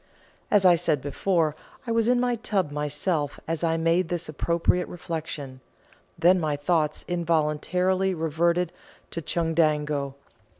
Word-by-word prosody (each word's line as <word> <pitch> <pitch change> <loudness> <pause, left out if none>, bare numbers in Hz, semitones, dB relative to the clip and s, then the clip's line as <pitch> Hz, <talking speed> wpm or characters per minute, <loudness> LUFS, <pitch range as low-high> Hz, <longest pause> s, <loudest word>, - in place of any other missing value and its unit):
As 200 -2 +4
I 180 - +8
said 165 -4 +1
before, 155 +3 0 0.3
I 230 - -3
was 230 -1 +2
in 245 0 +3
my 245 -1 +1
tub 200 -8 -1
myself 150 +1 -2
as 165 0 -2
I 165 -1 +2
made 165 +2 +1
this 175 -1 -2
appropriate 170 +3 0
reflection; 155 -6 -6 0.6
then 180 +2 +5
my 155 -3 0
thoughts 150 0 0
involuntarily 175 +3 +1
reverted 170 +2 0 0.4
to 165 - -4
Chundango. 150 -4 0
165 Hz, 130 wpm, -26 LUFS, 150-180 Hz, 0.6 s, I